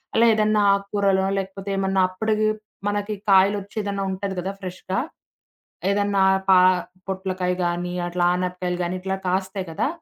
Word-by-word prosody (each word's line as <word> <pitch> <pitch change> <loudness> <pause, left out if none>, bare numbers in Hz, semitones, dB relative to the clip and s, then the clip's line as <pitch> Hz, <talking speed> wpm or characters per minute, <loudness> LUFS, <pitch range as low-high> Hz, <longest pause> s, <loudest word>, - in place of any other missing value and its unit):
అలా 230 - +5
ఏదన్నా 215 0 +2
ఆక్కూరలో 200 -1 +1
లేకపోతే 195 +1 -5
ఏమన్నా 195 0 +1
అప్పడికి 215 +3 0 0.4
మనకి 205 +1 -1 0.2
కాయలొచ్చి 195 +1 +3
ఏదన్నా 200 -1 -2
ఉంటది 190 0 -4
గదా! 185 +2 -3
ఫ్రెష్‌గా. 185 0 -4 0.9
ఏదన్నా 200 -1 +2 0.3
పా 185 -1 +8 0.5
పొట్లకాయ 185 -1 -2
గానీ, 175 +1 -2
అట్లా 175 0 -1
ఆనపకాయలు 180 0 -2
గానీ, 175 +1 -2
ఇట్లా 190 +1 -2
కాస్తాయి 190 +1 -2
గదా! 160 - 0
190 Hz, 130 wpm, -23 LUFS, 185-200 Hz, 0.9 s, పా